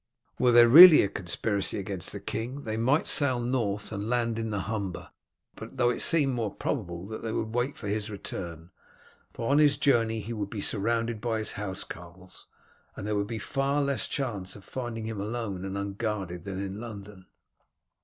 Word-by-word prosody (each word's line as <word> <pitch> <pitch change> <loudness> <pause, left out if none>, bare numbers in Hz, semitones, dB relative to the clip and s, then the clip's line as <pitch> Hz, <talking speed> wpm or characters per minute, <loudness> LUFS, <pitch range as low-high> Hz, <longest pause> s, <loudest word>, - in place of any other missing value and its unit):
Were 125 - +4
there 120 0 +8
really 160 +6 +11
a - - +1
conspiracy 100 +2 -2
against 95 -2 -3
the 100 - -6
king 120 +8 -5
they 110 -1 -3
might 130 +7 +2
sail 130 -4 +2
north 120 -4 -2
and 105 0 -4
land 115 -2 0
in 110 -1 -3
the 105 -2 -2
Humber, 100 -5 -4 0.5
though 120 +2 0
it - - -2
seemed 145 -5 +3
more 115 -4 -2
probable 85 -8 -4
that 110 +2 -7
they 115 - -3
would 110 0 -3
wait 125 +4 -1
for - - -7
his 105 +1 -2
return, 85 -5 -7 0.6
for 115 +3 -3
on 145 - +5
his 145 -2 +4
journey 115 -5 +2
he 110 +2 -6
would 105 -3 -4
be 105 - -5
surrounded 115 +2 -1
by 115 -1 -1
his 110 - -2
housecarls, 95 -2 -8 0.5
and - - -7
there 105 0 -1
would 100 0 -1
be 115 0 -4
far 135 +6 -1
less 140 -1 -1
chance 105 -9 -4
of 100 -2 -13
finding 120 -3 -5
him 110 -3 -4
alone 105 -3 -4
and 95 0 -4
unguarded 100 -3 -4
than 95 -1 -5
in 100 +1 -5
London. 105 -4 -9
110 Hz, 185 wpm, -28 LUFS, 100-120 Hz, 0.6 s, really